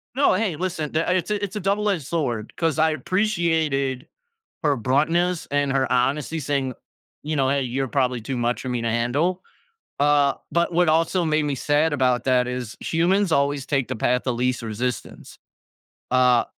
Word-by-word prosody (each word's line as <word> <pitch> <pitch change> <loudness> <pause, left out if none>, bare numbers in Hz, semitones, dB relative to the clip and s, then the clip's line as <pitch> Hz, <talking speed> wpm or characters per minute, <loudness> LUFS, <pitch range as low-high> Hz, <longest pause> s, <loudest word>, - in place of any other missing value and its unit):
No, 280 +2 +4
hey, 185 -5 0
listen, 170 -4 -3
tha 165 +3 +1
it's 185 +2 -1
a 210 -1 -1
it's 200 0 -4
a 210 - -2
double 205 +2 0
edged 175 -9 -1
sword, 125 -9 -2
'cause 165 -3 0
I 160 0 +3
appreciated 160 -6 0 0.6
her 145 -3 +2
bluntness 160 +8 +1
and 145 -1 +1
her 135 -1 0
honesty 140 +5 0
saying, 140 -3 -1 0.5
you 155 +1 -2
know, 135 -2 +2
"Hey, 140 0 +1
you're 130 +1 -2
probably 125 -3 0
too 130 +3 -4
much 120 +1 -1
for 130 - -5
me 125 -1 -2
to 115 - -1
handle," 140 +11 0 0.6
uh, 145 -1 +3 0.2
but 170 +1 +1
what 175 0 +2
also 165 +3 +2
made 155 -1 +1
me 145 -2 -1
sad 145 +4 +1
about 130 -4 +1
that 125 -1 +2
is 125 -3 -5
humans 175 +2 +1
always 140 -1 +1
take 135 -2 -1
the - - -3
path 125 +2 +1
of 125 - +1
least 125 0 0
resistance. 115 +1 -5 0.8
Uh, 125 -2 +4
145 Hz, 180 wpm, -23 LUFS, 125-165 Hz, 0.8 s, No